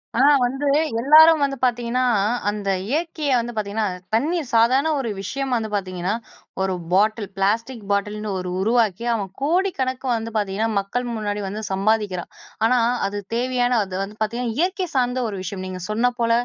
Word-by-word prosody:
ஆனா 260 +4 +5 0.2
வந்து 270 +4 -1 0.3
எல்லாரும் 310 +3 +7
வந்து 275 -1 0
பார்த்தீங்கன்னா, 245 0 +1 0.5
அந்த 205 -1 -3 0.2
இயற்கைய 310 0 -1
வந்து 240 +1 -4
பார்த்தீங்கன்னா, 215 0 -1 0.3
தண்ணீய 320 +8 +1
சாதாரண 255 +7 +4
ஒரு 250 -4 -2
விஷயம் 265 +7 -3
வந்து 220 -2 -2
பார்த்தீங்கன்னா, 185 -1 -2 0.5
ஒரு 190 0 0 0.2
பாட்டில் 210 +2 +2
பிளாஸ்டிக் 225 +4 0
பாட்டில்னு 210 +1 -1
ஒரு 180 0 -4
உருவாக்கி, 225 0 +1
அவன் 200 -4 -3
கோடிக்கணக்கு 280 -5 0
வந்து 225 0 -4
பார்த்தீங்கன்னா, 205 +2 0
மக்கள் 215 +6 -3
முன்னாடி 210 -1 -2
வந்து 210 +3 -5
சம்பாதிக்கிறான். 195 -2 0 0.3
ஆனா 250 +2 +4 0.3
அது 205 +1 -4 0.2
தேவையான 245 0 +1
அது 185 -1 -7
வந்து 205 +2 -9
பார்த்தீங்கன்னா, 230 +1 -1
இயற்கை 370 +2 0
சார்ந்த 250 0 +1
ஒரு 200 - -5
விஷயம். 185 0 -5
நீங்க 185 0 -6
சொன்ன 230 +4 +2
போல 230 0 +2
230 Hz, 155 wpm, -22 LUFS, 205-255 Hz, 0.5 s, எல்லாரும்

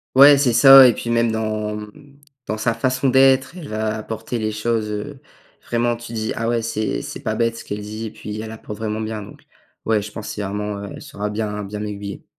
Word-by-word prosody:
Ouais, 140 +2 +9
c'est 135 -3 +3
ça 135 +2 +9
et - - +2
puis 115 - -6
même 115 -1 +2
dans, 110 -1 -2
mmh, 140 +7 -12 0.3
dans 110 - -3
sa 115 +2 0
façon 130 +3 0
d'être, 130 +3 +4
elle 170 -5 -9
va 110 0 -2
apporter 110 +2 -5
les 110 0 -1
choses, 110 0 -1
heu, 110 +7 -6 0.4
vraiment 120 0 0
tu 120 0 -10
dis: 110 -1 -2
«Ah 115 +1 -1
ouais, 120 -1 +1
c'est 110 -1 -2
c'est - - -7
pas 110 - -2
bête 115 0 0
ce 115 - -9
qu'elle 105 - -5
dit» 110 +2 -6
et - - -8
puis 105 -1 -7
elle 110 0 -7
apporte 110 -1 -8
vraiment 110 0 -3
bien 110 -1 -4
donc, 100 - -13 0.4
ouais, 110 -2 +2
je 105 +1 -8
pense 110 0 -7
c'est 105 - -5
vraiment 105 +1 -4
elle 100 - -8
saura 105 +1 -5
bien 105 -1 -3
bien 105 +1 -6
m'aiguiller. 105 -1 -6
110 Hz, 230 wpm, -21 LUFS, 105-120 Hz, 0.4 s, Ouais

